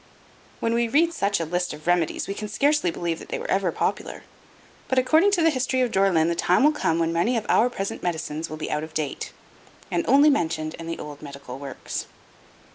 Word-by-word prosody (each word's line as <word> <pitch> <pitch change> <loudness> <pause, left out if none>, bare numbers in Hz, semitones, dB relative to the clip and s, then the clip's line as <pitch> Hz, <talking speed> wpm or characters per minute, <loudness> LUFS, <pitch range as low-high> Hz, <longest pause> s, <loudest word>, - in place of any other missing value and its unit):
When 230 - 0
we 235 0 +2
read 330 +7 +3
such 200 - 0
a 165 - -1
list 175 +1 -2
of 150 0 -11
remedies 175 -2 +1
we 195 - -2
can 210 +1 -5
scarcely 280 0 +2
believe 170 -1 -3
that - - -12
they - - -2
were - - -5
ever 190 -3 +2
popular, - - -3 0.6
but 260 - -1
according 315 +9 +4
to 350 -4 +3
the 325 - +5
history 260 -1 0
of 245 -2 +1
Dore 195 +1 +3
lyn 160 -3 +3
the 170 - +1
time 180 +6 +2
will 300 - +6
come 165 - 0
when 165 0 0
many 185 +9 +1
of 215 - -3
our 240 - +4
present 195 -5 -4
medicines 160 -2 -3
will 155 - -6
be 155 - -4
out 150 0 -1
of 155 0 -9
date, 155 -3 -3 0.6
and 175 -1 +1
only 285 +4 +6
mentioned 160 - -1
in 165 - -7
the 165 - -3
old 145 -1 -8
medical 140 -3 -9
works. 140 -1 -6
180 Hz, 225 wpm, -24 LUFS, 160-250 Hz, 0.6 s, will